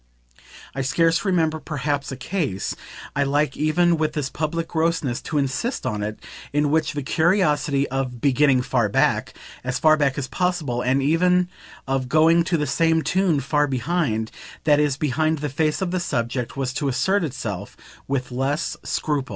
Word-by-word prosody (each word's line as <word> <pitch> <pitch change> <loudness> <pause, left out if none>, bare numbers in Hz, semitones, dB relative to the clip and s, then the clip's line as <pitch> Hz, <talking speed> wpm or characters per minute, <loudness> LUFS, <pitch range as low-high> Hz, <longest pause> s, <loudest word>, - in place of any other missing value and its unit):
I 135 - -2
scarce 165 +5 +2
remember 165 -5 +1
perhaps 145 -2 -2
a 130 - -5
case 130 - -2 0.4
I 145 - +1
like 145 +2 +1
even 170 +3 +2
with 155 -1 0
this 145 -3 -2
public 165 +2 -2
grossness 160 -6 0
to 155 - -3
insist 145 - -1
on 105 -1 -2
it 105 +1 -3 0.3
in 145 0 +1
which 155 0 +1
the 145 -1 -3
curiosity 150 -3 +2
of 130 -2 -3
"beginning 135 0 +3
far 120 -5 +1
back," - - +1 0.3
as 125 +1 -1
far 155 0 +5
back 140 -3 +1
as 135 -2 -2
possible, 165 -10 -1
and 130 +2 +1
even 180 +4 +3 0.4
of 135 -1 -1
going, 160 +3 +5
to 170 -1 +1
the 150 - 0
same 160 +3 +2
tune, 185 -6 +1
far 145 +2 +1
"behind," 130 -4 -1 0.3
that 150 -2 +4
is 145 -2 +1
behind 155 +2 +1
the 150 0 -3
face 155 +5 0
of 180 - -2
the 185 - 0
subject, 125 -5 -2
was 130 -2 -2
to 140 - -2
assert 190 +9 +1
itself 110 - -5 0.3
with 130 -2 -2
less 135 +6 -1
scruple. 145 -4 -2
145 Hz, 170 wpm, -23 LUFS, 130-160 Hz, 0.4 s, far